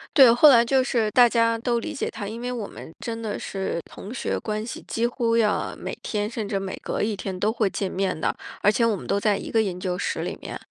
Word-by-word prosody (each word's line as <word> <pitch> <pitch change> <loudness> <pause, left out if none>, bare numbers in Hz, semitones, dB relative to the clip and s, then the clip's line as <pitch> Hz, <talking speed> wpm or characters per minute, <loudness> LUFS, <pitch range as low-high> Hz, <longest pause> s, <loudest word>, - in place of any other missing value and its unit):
对， 260 -5 +9
后 245 +6 +7
来 240 -5 +8
就 260 +2 +3
是 225 -4 0
大 245 +1 +7
家 230 -1 +2
都 235 0 0
理 310 - -5
解 275 - -2
他。 210 -2 -6
因 220 +3 -6
为 245 +1 -3
我 235 -5 -4
们 - - -10
真 230 -1 -4
的 220 -2 -3
是 190 -3 -3
同 205 - -10
学 255 - -2
关 215 0 -3
系， 230 - -6
几 230 +1 0
乎 235 -1 0
要 215 -2 +1
每 - - -6
天， 210 -1 -2
甚 220 -2 -4
至 200 - -1
每 195 -1 -4
隔 - - -2
一 210 -1 -1
天 190 -1 -4
都 210 +4 +1
会 220 -3 +1
见 190 0 -3
面 190 -2 -1
的。 155 - 0 0.3
而 205 - +5
且 230 +2 +2
我 225 -2 +2
们 190 - -8
都 200 - +1
在 205 0 +2
一 - - -6
个 225 - +3
研 190 -4 -2
究 180 -1 -2
室 - - -2
里 - - -4
面。 - - -6
220 Hz, 285 characters per minute, -24 LUFS, 200-235 Hz, 0.3 s, 对